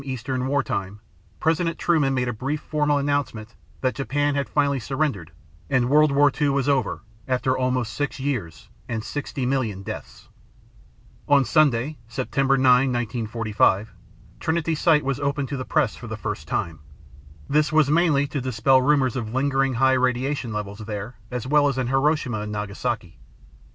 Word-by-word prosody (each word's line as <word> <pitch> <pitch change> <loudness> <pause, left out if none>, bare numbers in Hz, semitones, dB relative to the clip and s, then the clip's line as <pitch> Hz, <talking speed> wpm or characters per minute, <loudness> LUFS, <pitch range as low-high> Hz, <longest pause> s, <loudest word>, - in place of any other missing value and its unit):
Eastern 130 -1 -3
War 145 +1 +1
Time, 100 +1 -4 0.4
President 165 +1 +1
Truman 150 -6 +2
made 125 -1 0
a 120 - -1
brief 135 +7 -3
formal 150 -1 0
announcement 140 -6 -2 0.3
that 130 -1 +1
Japan 145 +2 0
had 140 0 -2
finally 140 -2 +1
surrendered 130 - -2 0.4
and 125 0 +1
World 150 0 +5
War 145 +1 +4
II 145 - +4
was 140 -1 0
over 140 -5 0 0.2
after 130 0 +1
almost 125 -3 -1
six 145 -1 -3
years 120 - -4 0.2
and 115 -2 -3
60 140 -1 -4
million 120 -7 -1
deaths! - - -8 1.0
On 140 -2 +5
Sunday, 145 0 +2
September 135 +3 0
9, 130 0 +4
1945, 115 -3 0 0.5
Trinity 165 0 0
Site 155 -1 +3
was 135 0 -1
opened 140 -1 -1
to 140 - -3
the 130 - -4
press 150 -8 +1
for 120 - -10
the 110 0 -5
first 105 -8 -5
time. 80 -2 -2 0.7
This 150 +1 +2
was 155 -2 +3
mainly 155 -4 +3
to 140 -1 -4
dispel 130 +1 +3
rumors 135 -2 +2
of 115 -2 -4
lingering 135 -1 +1
high 130 +2 +4
radiation 130 0 0
levels 105 -1 -5
there, 105 +1 -6
as 125 -1 -4
well 145 +2 +4
as 135 -2 -1
in 130 - 0
Hiroshima 135 -2 +1
and 105 0 -5
Nagasaki. 105 -1 -4
130 Hz, 160 wpm, -24 LUFS, 115-145 Hz, 1.0 s, World